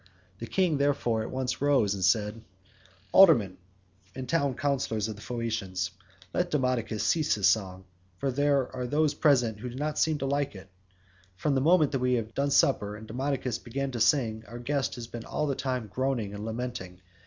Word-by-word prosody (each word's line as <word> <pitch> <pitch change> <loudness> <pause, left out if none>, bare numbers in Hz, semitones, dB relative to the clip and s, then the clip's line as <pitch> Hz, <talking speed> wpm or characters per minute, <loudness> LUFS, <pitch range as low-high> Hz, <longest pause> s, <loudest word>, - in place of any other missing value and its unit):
The 115 - -6
king, 175 -4 +1
therefore, 140 -6 +1
at - - -4
once 130 -1 -3
rose 135 -8 +3
and 95 -2 -4
said: 105 +2 +1 0.7
"Aldermen 115 - +6 0.6
and 130 0 -5
town 140 -3 +1
councillors 130 -7 -1
of 110 - -5
the 105 - -13
Phaeacians, 105 -7 -3 0.4
let 180 0 0
Demodocus 125 -7 0
cease 155 -2 +2
his 100 -2 +3
song, 95 -3 0 0.3
for 135 +5 -1
there 140 -1 +1
are 125 -1 -3
those 150 +2 +2
present 125 -8 +2
who 125 +3 -5
do 120 - -9
not 150 +3 -2
seem 160 -1 +2
to 135 - -3
like 140 -3 -1
it. 95 0 -12 0.6
From 140 +10 0
the 135 - +2
moment 160 0 +4
that 135 - 0
we 125 0 +1
had 115 -1 -3
done 140 +1 0
supper 105 -7 +2
and 110 +1 -10
Demodocus 130 0 -2
began 135 +3 -4
to 120 - -4
sing, 110 -3 +2
our 120 - -8
guest 135 +3 -1
has 120 -2 -6
been 115 0 -8
all 150 - -2
the 140 - 0
time 130 -3 -2
groaning 120 -2 -2
and 105 +1 -6
lamenting. 110 -6 -5
125 Hz, 190 wpm, -28 LUFS, 110-140 Hz, 0.7 s, Aldermen